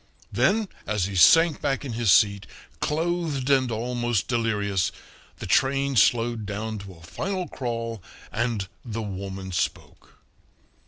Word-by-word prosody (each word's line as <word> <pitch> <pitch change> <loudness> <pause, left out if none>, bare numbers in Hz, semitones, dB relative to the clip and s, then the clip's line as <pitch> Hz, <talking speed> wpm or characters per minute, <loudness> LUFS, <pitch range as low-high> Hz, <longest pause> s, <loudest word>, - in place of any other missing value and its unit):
Then 215 +2 +2 0.2
as 105 -4 0
he 100 0 -5
sank 165 - +6
back 140 0 -1
in 125 - -4
his 115 -3 +2
seat, 100 0 +4 0.3
clothed 155 - -1
and 130 -2 +3
almost 120 -1 -1
delirious, 105 -6 0 0.5
the - - -7
train 135 +1 +2
slowed 115 +1 +3
down 110 +1 -4
to 100 -1 -10
a 80 - -17
final 185 - -3
crawl, 115 -4 -4 0.3
and 110 -3 -1 0.2
the 115 -2 -4
woman 95 -1 -6
spoke. 90 - -4
115 Hz, 130 wpm, -25 LUFS, 100-135 Hz, 0.5 s, sank